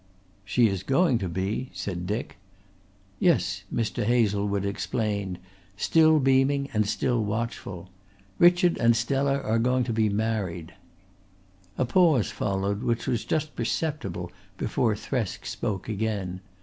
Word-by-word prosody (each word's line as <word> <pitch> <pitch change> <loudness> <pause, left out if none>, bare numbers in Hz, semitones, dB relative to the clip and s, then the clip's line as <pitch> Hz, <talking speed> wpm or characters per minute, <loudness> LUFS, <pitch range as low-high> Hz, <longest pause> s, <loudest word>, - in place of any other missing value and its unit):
"She 115 +5 +3
is 95 -3 -2
going 135 - +2
to 95 - -3
be," 95 +8 -2
said 90 -1 -4
Dick. 105 -2 -3 0.8
"Yes," 95 - +1
Mr. 115 -2 -1
Hazlewood 105 -3 +1
explained, 100 -2 -2 0.4
still 160 +6 +4
beaming 135 +1 +2
and 105 -1 +1
still 120 0 0
watchful. 105 -4 -4 0.5
"Richard 175 0 +5
and 115 0 +4
Stella 135 +4 +1
are 110 +1 +1
going 125 +2 +2
to 120 -1 -2
be 110 -1 +2
married." 100 -5 -2 1.0
A 130 - +1
pause 155 - +3
followed 100 +1 -1
which 115 -1 -1
was 120 -3 -1
just 155 -1 -1
perceptible 115 - -3 0.3
before 110 0 0
Thresk 115 -2 -3
spoke 100 -4 -3
again. 100 -4 -3
110 Hz, 125 wpm, -26 LUFS, 100-130 Hz, 1.0 s, Richard